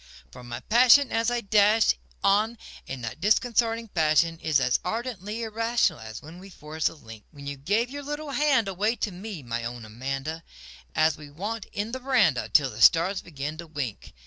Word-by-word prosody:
For 125 - -12
my 120 -1 -7
passion 250 +4 +5
as 230 +1 +1
I 240 0 -1
dash 210 +1 +4 0.3
on 215 +4 +2 0.3
in 135 -2 -6
that 120 +7 -6
disconcerting 230 +2 +2
fashion 165 -1 +2
Is 155 -3 +2
as 125 -1 +2
ardently 225 +1 -4
irrational 225 - 0
as 110 -1 -9
when 160 +4 -11
we 195 +1 -12
forged 155 -2 -3
the - - -4
link 115 -7 -13
When 140 -2 -12
you 140 0 -4
gave 205 - 0
your 285 +1 -6
little 295 +1 -5
hand 275 -7 +2
away 205 +5 0
to 210 - -3
me, 185 -3 -8
my 115 -1 -4
own 120 -1 -6
Amanda 135 +8 -5 0.5
An 155 +1 +4
we 150 - -10
sat 205 +9 -5
'n 210 +2 -2
the 260 - -4
veranda 240 - +2
till 140 -4 +3
the 110 +1 -8
stars 180 +8 +5
began 150 -1 -6
to 170 0 -8
wink. 145 -9 -6
180 Hz, 190 wpm, -26 LUFS, 145-225 Hz, 0.5 s, passion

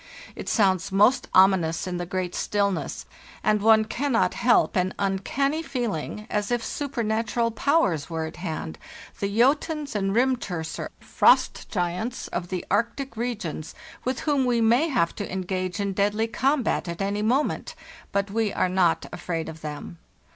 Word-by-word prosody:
It - - -5
sounds 190 -5 +2
most 225 +7 +4
ominous 185 -4 +4
in 180 -1 -3
the 175 0 -4
great 180 0 -2
stillness, 200 -2 -1 0.4
and 210 -1 +2
one 220 0 +5
cannot 250 +1 +1
help 240 -2 +3
an 185 0 0
uncanny 235 +10 0
feeling 215 - -3
as 205 -1 -1
if 240 -1 0
supernatural 230 -4 -1
powers 205 - +1
were 160 -1 -2
at 160 - -8
hand, 160 - -5 0.4
the 200 - 0
Jotuns 280 +6 +1
and 195 -1 0
Rimturser 225 -10 -1
(frost - - +3
giants) 180 +6 -2
of 175 0 -3
the 180 -1 -4
Arctic 230 +5 -1
regions, 220 -10 -4 0.3
with 255 0 -2
whom 290 -3 +1
we 245 -1 +2
may 235 +8 +4
have 240 - +1
to 205 - -4
engage 185 +1 -3
in 200 -1 -1
deadly 205 +3 +1
combat 260 0 0
at 170 0 -5
any 200 +1 -1
moment; 255 +10 0 0.4
but 200 0 -1
we 220 -1 0
are 185 - +1
not 180 -3 +2
afraid 165 -2 -3
of 160 0 -8
them. 150 +3 -7
205 Hz, 155 wpm, -25 LUFS, 185-240 Hz, 0.4 s, one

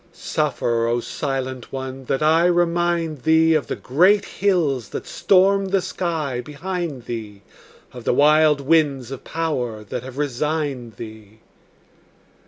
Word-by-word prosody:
Suffer, 115 -1 -1
O 120 +1 +1
silent 130 -1 -4
one, 130 0 -6
that 135 +3 -1
I 160 +2 +4
remind 170 -3 +1
thee 160 +2 +4
Of 155 -3 +1
the - - -3
great 185 +10 +3
hills 160 - 0
that - - -6
stormed 195 +1 +3
the 195 0 +2
sky 160 -9 -3
behind 155 -3 -5
thee, 110 -4 -7 0.5
Of 125 -2 -9
the - - +1
wild 150 0 +5
winds 140 -4 +2
of 135 - -7
power 125 -10 -3
that 110 +4 -5
have 130 +1 -10
resigned 145 -3 -2
thee. 110 -1 -11
145 Hz, 135 wpm, -22 LUFS, 125-165 Hz, 0.5 s, wild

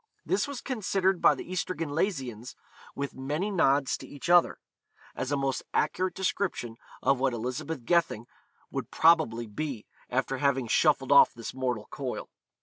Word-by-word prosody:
This 380 - +1
was 280 -4 -6
considered 195 -7 0
by - - +6
the - - -8
Ystradgynlaisians, 150 - -2 0.4
with 140 0 -4
many 150 +10 -2
nods 140 -7 +2
to - - -10
each 145 +4 -7
other, 175 -1 +5 0.6
as 130 - -4
a 145 - +1
most 135 -1 -1
accurate 185 0 0
description 185 - -2 0.3
of 135 -2 +3
what 130 -1 +1
Elizabeth 125 +4 -4
Gething 165 -8 +1 0.5
would - - -4
probably 155 -9 +3
be, 120 +1 -5 0.2
after 130 +1 -1
having 135 -3 +1
shuffled - - +2
off - - +7
this 115 -1 -7
mortal 125 -5 -2
coil. - - -5
140 Hz, 145 wpm, -28 LUFS, 125-175 Hz, 0.6 s, off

